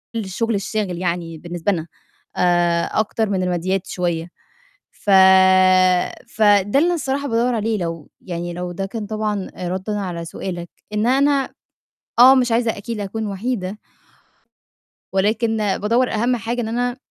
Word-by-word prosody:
الشُغل 225 +2 -2
الشاغِل 200 -2 -2
يعني 170 -2 -3
بالنسبة 175 +4 -2
لنا 165 -3 -3 0.5
آآ، 175 -1 +2 0.2
أكتر 220 0 0
من 190 -2 0
المادّيات 180 +2 -1
شوية. 175 -2 -2 0.6
ف 205 - -5 1.2
فده 205 +2 +3
اللي 335 - +3
أنا 350 - +1
صراحة 280 0 -2
بادوّر 235 +1 +1
عليه 220 -1 -1
لو 165 -3 -5
يعني 175 -1 -5
لو 180 0 -5
ده 195 +2 -4
كان 210 +1 -6
طبعًا 215 -2 -3
آآ، 180 - -4
رَدًا 190 +3 -3
على 175 -3 -4
سؤالك، 175 0 -6 0.2
إن 210 +2 +1
أنا 275 +1 +2 0.7
آه، 260 +2 +9
مش 250 -2 +2
عايزة 230 -1 +1
أكيد 215 +2 -5
أكون 210 +2 -4
وحيدة 200 -1 -3 1.3
ولكن 220 +4 +1
بادوّر 215 +4 +1
أهَم 240 +3 +1
حاجة 235 +2 -3
إن 220 - -3
أنا 245 +2 -1
205 Hz, 145 wpm, -20 LUFS, 180-230 Hz, 1.3 s, آه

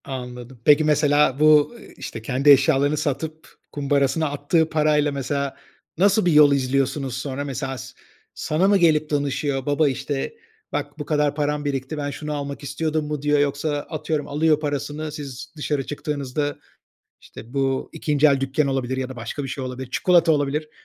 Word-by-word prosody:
Anladım. 125 -2 -8
Peki 150 +1 +6
mesela 150 -2 +3
bu, 150 -1 +6
ııı, 235 - -14 0.2
işte 115 - -7
kendi 130 +5 +1
eşyalarını 140 +2 +4
satıp, 155 +3 -3 0.2
kumbarasına 145 +2 +1
attığı 145 +3 +1
parayla, 150 -1 +2
mesela 140 0 -2 0.4
nasıl 200 +3 +3
bir 175 - +4
yol 150 -1 +7
izliyorsunuz 135 -1 0
sonra? 135 +1 -4
Mesela 135 -1 -4
sa - - -9 0.4
sana 160 +5 0
mı 200 0 +5
gelip 155 -4 +3
danışıyor? 140 -2 -1
Baba, 145 +1 +2
işte, 135 - -3 0.4
"Bak - - -4
bu 150 - -4
kadar 150 -1 +1
param 150 0 -1
birikti, 140 +1 -3
ben 145 -1 -3
şunu 150 +1 -5
almak 140 -1 -5
istiyordum." 155 +2 -2
mu 150 -1 -4
diyor? 145 0 +2
Yoksa 145 +2 0 0.2
atıyorum 155 -1 -3
alıyor 155 +1 +2
parasını, 150 +1 -3
siz 140 -2 -8
dışarı 145 -2 -2
çıktığınızda, 145 -1 -3 0.6
işte, 120 +3 -13
bu 135 -1 0
2. 150 -2 +2
el 140 -2 +3
dükkân 135 +2 0
olabilir 130 -1 -1
ya 130 -1 -3
da 130 - -8
başka 120 +5 -5
bir - - -4
şey 135 0 -5
olabilir, 130 0 -6
çikolata 175 +1 +4
olabilir, 150 +1 0
145 Hz, 165 wpm, -23 LUFS, 135-150 Hz, 0.6 s, yol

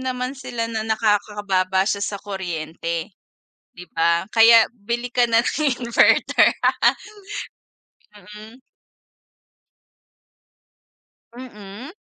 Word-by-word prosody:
naman 255 0 -3
sila 250 -4 -5
na 220 - -2
nakakababa 205 -3 0
siya 200 0 -1
sa 200 0 -3
kuryente, 170 -2 -5 0.6
'di 180 - -11
ba? 170 +1 +2
Kaya 225 +1 +6
bili 240 +2 -5
ka 245 0 +2
na 230 0 +3
ng 305 +4 -1 0.2
inverter. 235 -1 +3 1.6
Mm. 210 +4 -13 2.8
Mm? 225 +1 -10
210 Hz, 85 wpm, -21 LUFS, 195-240 Hz, 2.8 s, Kaya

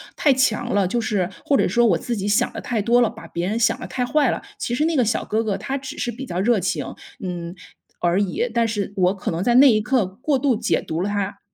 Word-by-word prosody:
太 290 - +3
强 260 -4 +1
了， 200 -2 +2
就 235 +6 -1
是 195 -5 -1
或 280 - +2
者 - - +2
说 240 0 +3
我 190 -7 +3
自 235 +8 -3
己 200 -2 -4
想 230 +4 +2
得 - - -6
太 230 -4 -1
多 235 +4 +3
了， 235 - +3
把 165 - -11
别 170 +2 -3
人 220 +3 -1
想 230 -1 +2
得 - - -5
太 250 - -2
坏 285 -1 +2
了， - - -3 0.2
其 240 - -3
实 295 +6 +1
那 330 0 0
个 260 - +4
小 220 0 -1
哥 220 +1 0
哥 205 -3 -1
他 265 +7 -3
只 270 +2 -8
是 - - -2
比 240 +3 -6
较 180 -8 -4
热 225 +4 +3
情， 185 - -1 0.3
嗯， 175 -2 -5 0.5
而 175 +3 +2
已， 205 +5 -1
但 235 -1 +2
是 205 -3 -3
我 185 0 +2
可 195 - -5
能 170 +2 -2
在 240 +3 +2
那 270 +2 +8
一 215 -3 +3
刻 235 0 +1
过 250 +9 -1
度 265 -2 +2
解 225 +1 0
读 160 +2 -4
了 195 - -1
他。 200 -1 -3
220 Hz, 290 characters per minute, -22 LUFS, 195-245 Hz, 0.5 s, 那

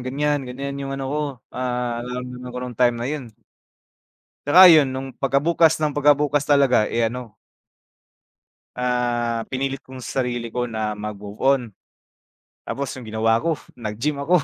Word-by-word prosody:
ganyan 145 +3 0
ganyan 140 +2 -5
yung 135 0 -4
ano 135 - -4
ko, 150 - -1 0.3
ah, 125 -1 -2
nararamdaman 125 +1 -6
ko - - -3
nung 120 -3 -8
time 120 -1 +4
na 120 - -4
yun. 150 -4 -4 1.2
Tsaka 180 +5 +9
'yun 155 -4 +7
nung 135 0 -5
pagka 135 +2 0
bukas 165 -1 +4
ng 150 - +2
pagka 145 0 +4
bukas 145 0 0
talaga, 140 -6 +4
eh, 115 0 0
ano 120 -3 -8 1.4
ah, 120 -2 0
pinilit 135 0 -2
ko 130 -1 -13
sa 135 - -2
sarili 120 -2 -3
ko 125 0 -2
na 110 -2 -2
mag-move 105 0 -7
on. 135 0 +3 1.1
Tapos 140 -1 -3
yung 125 -4 -9
ginawa 115 +1 +2
ko 165 -1 0 0.2
nag-gym 115 +6 -3
ako. 170 +6 +3
125 Hz, 160 wpm, -22 LUFS, 120-140 Hz, 1.4 s, Tsaka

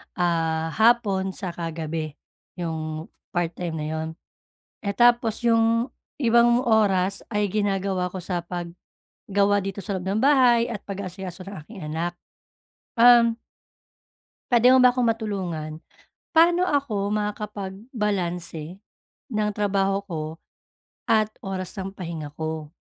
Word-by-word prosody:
ah, 165 -2 0
hapon 205 -4 +2
'tsaka 175 -3 -4
gabi, 155 -2 -4 0.4
yung 160 -2 -4 0.2
part-time 175 -1 -2
na 155 -1 -3
'yon. 160 0 -2 0.8
Eh, 200 0 -1
tapos 240 0 +3
yung 230 +1 +3 0.3
ibang 235 0 +4
oras 200 -5 +2
ay 210 -1 +1
ginagawa 195 -3 0
ko 185 - -5
sa 180 0 -2
paggawa 190 +3 -2
dito 195 +1 -4
sa 200 -3 -2
loob 180 - -7
ng 205 +3 0
bahay 250 -4 +5
at 215 - -4
pag-aasikaso 185 -2 -6
ng 200 - -7
aking 210 -1 -11
anak. 160 +3 -2 0.9
Um 235 -1 +7 1.2
puwede 240 +1 +6
mo 255 0 +7
ba 250 - +7
akong 245 -1 +1
matulungan? 190 -9 -2 0.6
Paano 345 +2 +5
ako 235 - 0
makakapag-balanse 200 - -3 0.5
ng 215 -4 0
trabaho 195 -1 +1
ko 160 -4 -3 0.8
at 215 -1 +3 0.2
oras 190 -1 -4
ng 195 0 -4
pahinga 165 -6 -6
ko? 155 0 -5
195 Hz, 120 wpm, -24 LUFS, 175-225 Hz, 1.2 s, Um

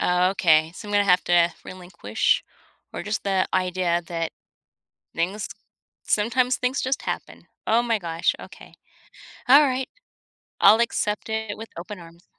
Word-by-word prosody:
Oh 180 +1 +2
okay, 160 -4 +3
so 210 - -9
I'm - - -5
gonna 205 0 +3
have 180 -1 +4
to 175 -1 +3
relinquish 175 - -1 0.5
or - - -5
just 210 +1 -3
the 190 -1 +1
idea 180 -2 0
that 165 -1 -3 0.8
things 190 +5 -2 0.6
sometimes 245 +4 +1
things 250 +2 -1
just 260 +1 -1
happen. - - -6 0.2
Oh 230 +2 +3
my 230 -2 0
gosh, 165 -3 -1
okay. - - -13 0.8
Alright. 265 -2 +5 0.7
I'll 215 +3 +7
accept 210 -2 -1
it 220 -1 -3
with 225 +1 -9
open 200 +4 -7
arms. 170 +1 -15
195 Hz, 140 wpm, -24 LUFS, 175-220 Hz, 0.8 s, I'll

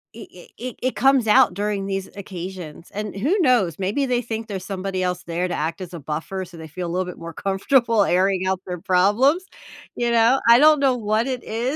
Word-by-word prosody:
i 230 - -10
i 175 - -13 0.2
i 255 - -5
it 255 - -1
comes 265 -3 +3
out 210 - +5
during 200 0 -2
these 195 -1 -3
occasions, 180 -4 -8
and 210 -1 -4
who 280 - +1
knows, 245 - +2
maybe 205 +9 -1
they 245 -1 +1
think 225 -1 -5
there's 190 -4 -6
somebody 190 -1 -3
else 180 0 -2
there 175 +2 -2
to 180 - -4
act 160 +3 -3
as 180 -1 -8
a 170 - -6
buffer 160 +6 -4
so 175 -1 -14
they 160 -1 -9
feel 175 +3 -5
a - - -5
little 185 +1 -1
bit 180 - -8
more 165 0 -7
comfortable 225 +4 +2
airing 185 0 +1
out 190 0 0
their 180 -2 -6
problems, 215 - +3 0.5
you 240 0 0
know? 235 +3 +4
I 235 - +9
don't 305 +1 +6
know 270 -2 +3
what 215 +1 0
it 255 -2 -3
is, 240 +6 -2
195 Hz, 225 wpm, -22 LUFS, 180-235 Hz, 0.5 s, I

